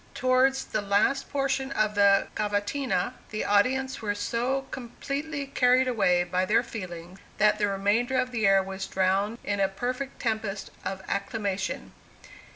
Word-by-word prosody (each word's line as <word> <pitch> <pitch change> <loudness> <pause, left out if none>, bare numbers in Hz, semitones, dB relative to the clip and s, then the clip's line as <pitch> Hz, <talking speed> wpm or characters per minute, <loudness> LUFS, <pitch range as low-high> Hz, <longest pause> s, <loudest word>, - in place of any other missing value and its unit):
Towards 260 +1 +2
the 215 - -2
last 205 +7 +1
portion 270 -1 -1
of 215 -1 +1
the 200 -1 +5
cavatina, 210 +2 -1 0.2
the 215 - -3
audience 255 +6 +2
were 205 -2 -1
so 245 +6 -1
completely 280 +4 -4
carried 255 -1 +3
away 195 -7 +3
by 180 +1 0
their 210 +5 +3
feelings, 180 -5 -8 0.2
that 210 +1 +3
the 205 - +2
remainder 205 +6 +1
of 250 -1 0
the 225 -4 +1
air 195 0 +5
was 190 0 -5
drowned 195 +4 +1
in 205 -1 -2
a 195 -1 +3
perfect 250 +7 -4
tempest 220 -4 -2
of 190 0 -4
acclamation. 200 -2 -3
215 Hz, 150 wpm, -27 LUFS, 195-255 Hz, 0.2 s, the